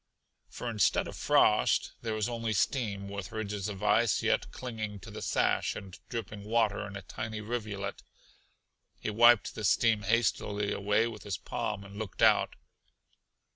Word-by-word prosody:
For 125 - -6
instead 110 -5 +2
of - - -7
frost - - +3
there 110 -2 -2
was 110 -1 0
only 115 -2 -2
steam 100 -2 0
with 100 -2 -6
ridges 105 -2 -3
of 100 -2 -7
ice - - +3
yet - - +1
clinging 110 -5 -5
to - - -10
the - - -7
sash - - +1
and 95 -2 -8
dripping 105 -3 -5
water 105 -1 +1
in 100 - -9
a 100 - -7
tiny 110 +3 -5
rivulet. 105 -3 -4 1.0
He - - -3
wiped 120 +1 +5
the 110 - -6
steam 110 +1 +3
hastily 105 -1 +1
away 105 +3 +2
with 115 - -7
his 100 -3 -3
palm 100 - -3
and 100 0 -11
looked 105 -4 -3
out. - - +4
105 Hz, 160 wpm, -30 LUFS, 100-115 Hz, 1.0 s, wiped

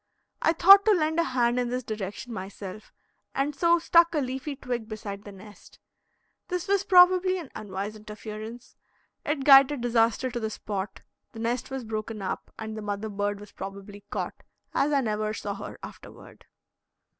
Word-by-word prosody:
I 325 - +3
thought 390 +4 +8
to 435 - +6
lend 320 -2 +1
a - - +4
hand 250 -3 +1
in 245 -1 -1
this 250 +1 -2
direction 215 +2 -5
myself, 195 +1 -8 0.4
and 280 +2 0
so 340 +3 +4
stuck 335 0 +4
a - - +2
leafy 270 +1 -3
twig 245 -4 -4
beside 205 -2 -6
the 205 - -8
nest. 205 +1 -15 0.7
This 360 +1 -3
was 400 0 +2
probably 370 0 +5
an 330 -7 -8
unwise 205 +1 -5
interference; 215 +3 -9 0.5
it 295 -2 -1
guided 275 -1 +7
disaster 235 +1 +2
to 240 - -3
the 220 -1 -2
spot; 200 -2 -5 0.3
the 225 - -9
nest 230 +2 -2
was 265 -1 -4
broken 220 0 -5
up, 195 - -4
and 220 0 -6
the 215 - -5
mother 205 +1 -3
bird 205 0 -2
was 205 0 -12
probably 200 +1 -9
caught, - - -4 0.3
as 290 - +2
I 280 -2 +3
never 215 -2 -1
saw 205 -1 -4
her 200 - -8
afterward. - - -12
230 Hz, 170 wpm, -27 LUFS, 210-285 Hz, 0.7 s, thought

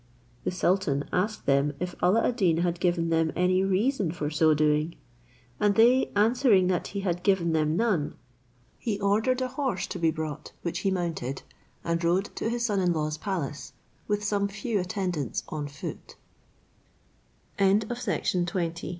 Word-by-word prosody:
The - - +1
sultan 180 -6 0
asked 210 +4 -1
them 140 +1 +2
if 180 0 -3
Alla 210 +6 +3
ad 245 - -1
Deen 175 -7 +3
had 170 0 0
given 175 -2 +1
them 165 -1 +2
any 185 +2 +2
reason 195 - +1
for 150 -3 -3
so 155 0 +4
doing, 150 +2 +1 0.6
and 205 -1 +3
they 245 +3 +5
answering 220 -2 +4
that 180 -2 0
he 200 - -4
had 175 -2 -1
given 180 -4 +2
them 155 0 +1
none, 195 -10 0 0.6
he 210 -4 -2
ordered 220 +6 +1
a 255 - -2
horse 260 -7 -2
to - - -6
be 165 -1 +3
brought, 155 -2 -5
which 175 0 -2
he 195 - 0
mounted, 165 -8 -3 0.4
and 170 0 -1
rode 180 +4 +1
to 225 - -1
his 235 0 -1
son 205 -4 +1
in 180 -2 +2
law's 155 -1 -2
palace, 160 -8 -4 0.3
with 210 0 0
some 200 -1 +1
few 200 +2 -2
attendants 180 - -2
on 150 -2 -4
180 Hz, 150 wpm, -27 LUFS, 160-205 Hz, 0.6 s, they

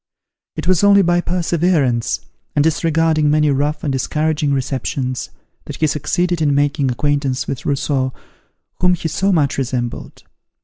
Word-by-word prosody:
It - - -5
was 185 0 +3
only 200 -1 +6
by 175 0 +2
perseverance, 170 -9 0 0.3
and 145 - +3
disregarding 160 -1 +2
many 150 0 +3
rough 145 +3 -1
and 140 - -1
discouraging 150 +2 0
receptions, 130 -1 -2 0.4
that - - -7
he 155 - +1
succeeded 175 +3 0
in 145 -2 +2
making 140 -1 +1
acquaintance 135 -1 -1
with 135 - -4
Rousseau, 135 -2 0 0.7
whom 180 0 +3
he 165 - -4
so 190 +5 0
much 145 -6 +1
resembled. 125 -2 -4
150 Hz, 140 wpm, -18 LUFS, 135-165 Hz, 0.7 s, only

